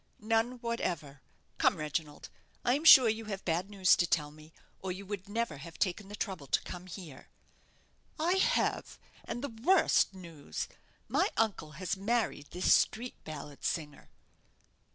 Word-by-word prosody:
"None 225 +3 +1
whatever. 175 - -3 0.4
Come, - - +4
Reginald, 150 0 -4 0.3
I 245 - +4
am 290 +4 -1
sure 260 -6 +10
you 220 0 -1
have 195 -2 -6
bad 175 +3 0
news 195 -3 +4
to 175 - +2
tell 150 -3 0
me, 155 +1 -15 0.3
or 190 - -4
you 190 +2 -7
would 200 0 -6
never 220 -8 -2
have 165 +4 -10
taken 195 +2 -1
the 205 - -7
trouble 185 -10 -4
to - - +1
come 180 0 -8
here." 165 -7 -10 0.9
"I 345 +4 +2
have, - - +1 0.3
and 240 - -5
the 285 - -2
worst 365 - +4
news. 165 -6 -6 0.4
My - - +2
uncle 200 -9 0
has 185 +4 -2
married 210 -7 -1
this 180 +1 +3
street 240 +3 +1
ballad 150 -2 -8
singer." 150 -3 -3
185 Hz, 155 wpm, -31 LUFS, 155-225 Hz, 0.9 s, sure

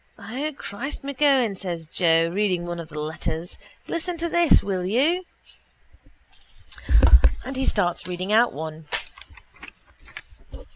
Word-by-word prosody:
—O, 275 +7 -4
Christ 255 +10 -6
M'Keown, 275 -6 +2
says 175 -4 -5
Joe, 165 -1 +2
reading 185 -3 0
one 175 0 -5
of 165 -1 -8
the 155 - -9
letters. 160 +2 -4 0.3
Listen 340 +1 -3
to 340 +1 -2
this, 345 -1 +4
will 190 -2 -2
you? 280 - +1 2.2
And 265 +1 -5
he 265 0 -1
starts 175 -4 0
reading 185 +3 -3
out 235 +2 +5
one. 155 0 -7
195 Hz, 115 wpm, -24 LUFS, 170-270 Hz, 2.2 s, out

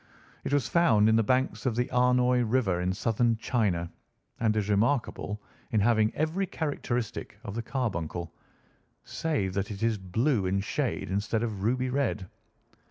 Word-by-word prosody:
It - - -3
was 145 -3 +2
found 115 -12 +4
in 110 - +5
the 115 - +5
banks 130 +4 0
of 120 - 0
the 125 +2 +1
Amoy 125 0 +4
River 110 -7 +1
in 90 +1 0
southern 115 +2 +1
China 100 -8 0 0.5
and 110 -2 +2
is 105 -2 0
remarkable 105 -1 0 0.3
in 110 - +2
having 110 0 +3
every 165 +6 0
characteristic 125 -8 -3
of 100 - -6
the 115 - -2
carbuncle, 90 - -3 0.7
save 140 - -2
that 100 0 -2
it 105 +1 -5
is 115 -2 +1
blue 105 +3 +1
in 95 +1 +1
shade 100 - -2
instead 105 +3 0
of 105 -4 -3
ruby 125 +4 0
red. 125 -8 -1
115 Hz, 160 wpm, -28 LUFS, 100-125 Hz, 0.7 s, in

